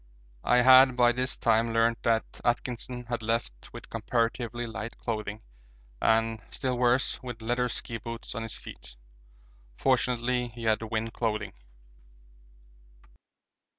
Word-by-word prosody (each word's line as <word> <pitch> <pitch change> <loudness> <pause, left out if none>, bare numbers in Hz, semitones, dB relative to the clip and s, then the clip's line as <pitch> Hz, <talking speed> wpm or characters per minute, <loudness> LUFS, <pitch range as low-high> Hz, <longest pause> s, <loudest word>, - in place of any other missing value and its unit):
I 125 0 +4
had 130 0 +8
by 120 -1 +6
this 125 +1 -1
time 115 0 +2
learnt 115 0 +2
that 115 -1 0
Atkinson 125 0 -2
had 120 0 -3
left 115 - -2
with - - -10
comparatively 115 +1 -1
light 115 0 -6
clothing 110 -2 -4 0.6
and, 115 0 +2
still 130 -1 -2
worse, 125 +1 +2
with 120 -3 -7
leather 120 +2 0
ski 115 0 -5
boots 115 +1 -7
on 115 - -4
his 115 -1 -5
feet; - - -10 0.8
fortunately 125 -1 +1
he 120 0 -10
had 110 -1 +2
wind 110 0 -3
clothing. 110 -2 -2
115 Hz, 125 wpm, -28 LUFS, 115-125 Hz, 0.8 s, had